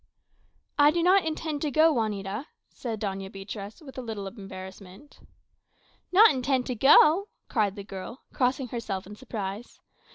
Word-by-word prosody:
"I 290 0 +8
do 335 +2 +1
not 370 0 +5
intend 310 -2 -3
to 300 - 0
go, 315 +3 +4
Juanita," 210 - -2 0.2
said 225 -4 -5
Doña 195 -2 -4
Beatriz, 200 - -8
with 270 -2 -9
a - - -3
little 220 -4 -5
embarrassment. 195 +3 -10 0.9
"Not 425 +5 +8
intend 260 -1 0
to 255 - -2
go!" 305 - +6 0.2
cried 205 -4 +1
the 200 - -7
girl, 195 +6 -8
crossing 255 0 0
herself 220 -6 -4
in 205 +2 -10
surprise. 210 -2 -6
230 Hz, 150 wpm, -27 LUFS, 195-285 Hz, 0.9 s, I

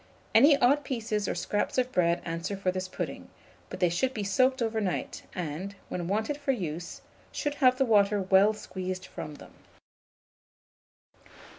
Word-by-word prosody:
Any 280 +5 +7
odd 280 +3 +3
pieces 220 -6 -2
or - - -1
scraps 205 - -1
of 255 0 +1
bread 170 -5 +2
answer 170 +4 -3
for 190 -1 0
this 185 0 -4
pudding; - - -6 0.4
but - - -7
they 180 -2 +3
should 255 +10 0
be 210 - -2
soaked 255 +7 +2
overnight, 220 -5 -2
and, 180 +4 -4
when 175 -2 -3
wanted 220 +9 -1
for 285 -2 0
use, 170 -6 -5 0.3
should 290 - -2
have 255 -1 +5
the 270 - +3
water 205 -3 +4
well 190 +2 +5
squeezed 185 -3 -5
from 150 -4 -7
them. - - -14
200 Hz, 155 wpm, -28 LUFS, 185-250 Hz, 0.4 s, Any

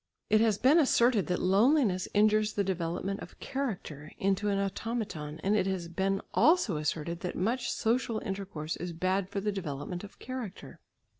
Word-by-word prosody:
It 215 0 +5
has 220 -3 +3
been 270 +9 +5
asserted 240 - +3
that 180 - 0
loneliness 200 0 +3
injures 215 0 +4
the 200 - +1
development 185 +1 -2
of - - -11
character 180 - -4
(into 195 +2 +1
an 200 - +1
automaton), 195 -6 -3
and 200 +2 +2
if 195 -3 +2
has 185 -3 -2
been 195 +3 -1
also 270 - +4
asserted 155 +2 -2
that 180 - -4
much 235 +7 0
social 230 0 0
intercourse 190 -6 -4
is 175 0 -5
bad 185 +3 0
for 200 - -2
the 210 +1 -1
development 175 -1 -5
of 205 - -11
character. 250 -7 -7
195 Hz, 165 wpm, -30 LUFS, 180-220 Hz, -, It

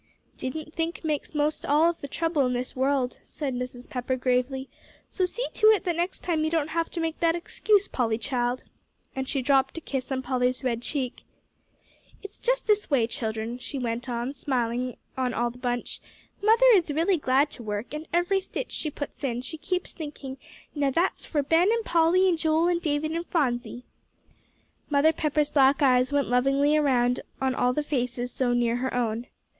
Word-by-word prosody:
"Didn't 310 +4 -5
think 335 0 -3
makes 305 -1 -2
most 300 +1 0
all 300 +3 +4
of 340 -1 -1
the 280 - -5
trouble 325 0 0
in 250 - -1
this 250 +1 -3
world," 265 -1 0
said 280 -4 -4
Mrs. 250 0 -5
Pepper, 255 0 -2
gravely; 255 +1 0 0.4
"so 370 -2 0
see 485 +7 -3
to 430 - +4
it 435 -2 +5
that 350 -3 0
next 345 +3 -2
time 325 -3 0
you 315 - +1
don't 315 -2 0
have 330 0 -1
to 345 - -5
make 325 -1 -2
that 335 -1 +3
excuse, 405 +4 +1
Polly 225 -3 0
child," 245 0 -1 0.5
and 265 0 -3
she 270 -3 -1
dropped 270 +2 +2
a - - -4
kiss 270 -3 -4
on 260 -1 -1
Polly's 250 0 0
red 235 -3 -1
cheek. 255 -1 -3 1.0
"It's 400 - -10
just - - 0
this 420 -1 +2
way, 265 -6 +3
children," 225 +1 -3
she 275 - -6
went 240 0 -3
on, 240 +2 -2
smiling 250 -3 -2 0.2
on 255 -2 -1
all 240 +1 0
the 245 - -15
bunch; 245 -1 -2 0.4
"Mother 450 +4 +5
is 360 -6 +3
really 335 +5 +2
glad 280 0 +2
to - - -9
work, 210 +3 -4
and 305 +1 -5
every 350 +3 +2
stitch 385 - -5
she 310 - -2
puts 290 0 -7
in, 245 -2 -1
she 260 - -5
keeps 365 +3 -2
thinking, 290 -4 -7 0.3
now 285 -2 +1
that's 335 +7 0
for 295 -3 0
Ben 330 +8 +4
and 460 -1 0
Polly 345 +3 +4
and 340 -3 +2
Joel 320 +2 +2
and 345 -1 +1
David 305 -1 0
and 335 +1 -3
Phronsie." 245 -6 -1 1.1
Mother 300 +2 +4
Pepper's 300 -1 0
black 275 +1 +4
eyes 255 0 +4
went 285 -2 +1
lovingly 275 +4 +3
around 250 -5 +2 0.2
on 265 -1 +1
all 250 -1 +2
the 300 +4 -1
faces 250 -3 -2
so 250 -1 0
near 240 -1 +2
her 260 +1 -2
own. 235 -1 -1
280 Hz, 195 wpm, -26 LUFS, 250-325 Hz, 1.1 s, it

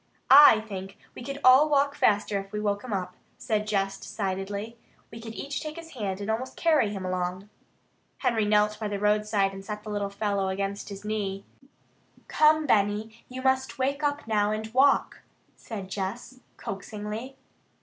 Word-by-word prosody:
"I 270 -6 +9
think 195 -2 -8 0.2
we - - -10
could 275 +2 -5
all 265 +4 +7
walk 280 -1 +3
faster 205 -5 +2
if 195 0 -9
we 210 - -3
woke 205 -1 -1
him 250 - -7
up," 180 -2 -3 0.2
said 215 -3 -1
Jess 195 -2 -1
decidedly. 200 +3 -4 0.3
"We 225 - -9
could 225 0 -8
each 280 +1 -4
take 305 0 -6
his 330 -1 -10
hand 205 - -4
and 205 +2 -2
almost 245 +4 -4
carry 310 -10 +3
him 195 -2 -5
along." 185 +2 -3 0.7
Henry 235 -4 +1
knelt 210 0 +2
by 215 - -2
the 205 -1 -3
roadside 210 -1 +1
and 195 0 -8
set 210 +1 -6
the 215 - -7
little 205 -1 -2
fellow 200 -1 -1
against 200 +2 -3
his 200 0 -9
knee. 200 -2 -3 0.8
"Come, 310 0 +4
Benny, 215 -1 0
you 255 +1 -7
must 265 +1 +1
wake 275 +2 -1
up 290 0 -1
now 210 -2 +1
and 220 +1 -4
walk!" 275 +2 +3 0.4
said 205 -5 -7
Jess 205 +7 -5 0.2
coaxingly. 210 +6 -6
210 Hz, 170 wpm, -27 LUFS, 200-255 Hz, 0.8 s, I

